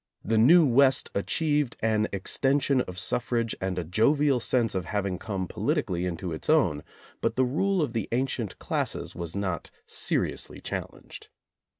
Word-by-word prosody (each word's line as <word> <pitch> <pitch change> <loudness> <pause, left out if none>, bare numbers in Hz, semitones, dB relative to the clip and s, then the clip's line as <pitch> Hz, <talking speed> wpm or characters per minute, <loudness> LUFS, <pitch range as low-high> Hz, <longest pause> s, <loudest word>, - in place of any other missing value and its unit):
The 110 0 +2
new 160 +9 +7
West 135 +1 +4
achieved 145 +5 0
an 110 -1 +1
extension 135 +7 +1
of 90 -6 -7
suffrage 115 +4 0
and 95 -1 -2
a 90 - -1
jovial 135 - +2
sense 115 -1 +1
of 95 -3 -2
having 100 -1 -2
come 95 -3 -4
politically 90 +2 -1
into 85 0 -4
its 80 - -6
own, 95 - +3 0.4
but - - 0
the 130 - +3
rule 180 +7 +1
of 125 - -3
the 115 -4 -2
ancient 120 -4 -2
classes - - -2
was 85 0 -6
not 95 -4 -3 0.2
seriously - - -2
challenged. - - -7
115 Hz, 155 wpm, -27 LUFS, 95-135 Hz, 0.4 s, new